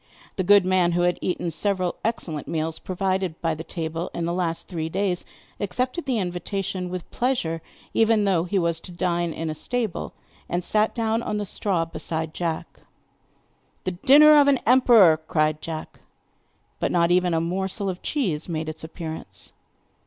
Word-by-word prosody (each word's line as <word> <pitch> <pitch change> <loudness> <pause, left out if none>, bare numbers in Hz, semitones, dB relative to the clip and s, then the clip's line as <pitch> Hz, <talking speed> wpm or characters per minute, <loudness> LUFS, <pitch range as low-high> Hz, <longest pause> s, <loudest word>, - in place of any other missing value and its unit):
The 190 - -1
good 200 +1 +6
man, 185 -2 +3
who 175 - +1
had 175 0 +1
eaten 175 -2 -2
several 185 +1 -1
excellent 165 -9 -2
meals 160 0 -2
provided 185 -2 -2
by 165 -1 0
the 160 +1 -6
table 165 0 -4
in 170 - -2
the 170 - -1
last 170 -2 -2
three 160 -3 -3
days, 185 0 -1 0.3
accepted 250 - -2
the 255 -3 +1
invitation 180 0 -3
with 180 -1 -6
pleasure, 205 -11 -1 0.3
even 225 -1 +3
though 185 -4 +2
he 195 +3 -1
was 170 -2 +1
to 180 - -10
dine 175 -1 -1
in 160 +1 -4
a 155 - -2
stable, 225 +4 -3 0.4
and 175 +1 -1
sat 215 +4 +1
down 225 -1 0
on 210 - -2
the 205 - -2
straw 185 -3 0
beside 160 -1 -4
Jack. 165 -2 -4 1.0
'The 185 - -1
dinner 290 +11 +7
of 285 - +3
an 280 -1 +5
emperor!' 235 -9 +6
cried 155 -1 +1
Jack. 160 -1 -6 0.8
But - - 0
not 170 -1 +3
even 180 -1 +3
a - - +2
morsel 190 +4 -2
of 185 -1 -3
cheese 185 - -2
made 160 -1 -2
its 155 0 -7
appearance. 160 0 -8
180 Hz, 170 wpm, -24 LUFS, 165-205 Hz, 1.0 s, dinner